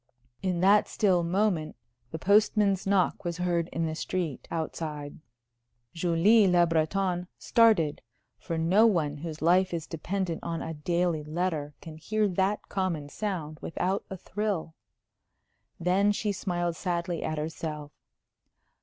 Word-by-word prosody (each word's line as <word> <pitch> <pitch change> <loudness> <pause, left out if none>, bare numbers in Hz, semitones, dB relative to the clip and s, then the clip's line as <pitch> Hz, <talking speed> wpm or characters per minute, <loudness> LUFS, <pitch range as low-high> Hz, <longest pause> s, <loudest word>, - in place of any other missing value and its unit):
In 180 -2 -1
that 200 +2 +5
still 185 -4 +2
moment 170 -3 0 0.3
the 160 - -5
postman's 200 +1 +3
knock 195 -2 +2
was 170 -1 -3
heard 175 -2 0
in 165 - -1
the 160 - -2
street 165 -3 -3
outside. 155 -3 -4 0.7
Julie 180 +6 +4
Le 175 -1 +5
Breton 175 +2 0
started, 210 -11 +3 0.4
for 165 -2 -4
no 185 +8 +4
one 155 -8 0
whose 155 0 -6
life 185 +3 +4
is 165 -2 -4
dependent 175 +1 -3
on 165 -1 -3
a 165 - -5
daily 170 +1 0
letter 155 -2 -2
can 160 -1 -9
hear 215 +6 0
that 190 +3 0
common 170 -7 -2
sound 160 -6 -4
without 185 +4 -1
a 190 - -6
thrill. 190 -4 -3 1.1
Then 190 +4 +3
she 205 0 -1
smiled 175 -3 -2
sadly 170 -1 -2
at 155 - -2
herself. 150 -1 -5
175 Hz, 135 wpm, -28 LUFS, 160-195 Hz, 1.1 s, that